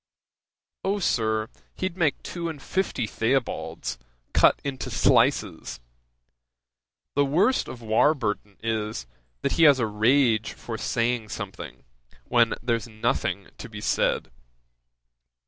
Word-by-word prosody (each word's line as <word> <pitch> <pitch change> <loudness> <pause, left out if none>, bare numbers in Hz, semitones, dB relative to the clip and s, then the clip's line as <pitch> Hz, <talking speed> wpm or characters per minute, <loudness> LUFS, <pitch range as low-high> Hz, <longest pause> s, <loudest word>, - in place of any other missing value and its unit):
"O, 195 +2 +1
Sir, 110 - +1 0.3
he'd 185 -2 -3
make 165 -6 0
two 170 -1 -4
and 155 -3 -7
fifty 180 -6 -1
Theobalds, 115 - -2 0.3
cut - - +5
into 135 -2 -4
slices! 60 - +2 1.3
The 145 - +3
worst 170 - +2
of 120 -2 -8
Warburton 110 -3 +1
is, 110 - -2 0.4
that - - +1
he 165 - +4
has 145 -3 +7
a 120 - +1
rage 110 +1 +2
for 115 - -7
saying 115 0 -1
something, - - -7 0.4
when 120 -1 +3
there's 115 -1 0
nothing 110 -1 -1
to - - -8
be - - -8
said." 65 - 0
120 Hz, 115 wpm, -26 LUFS, 110-145 Hz, 1.3 s, has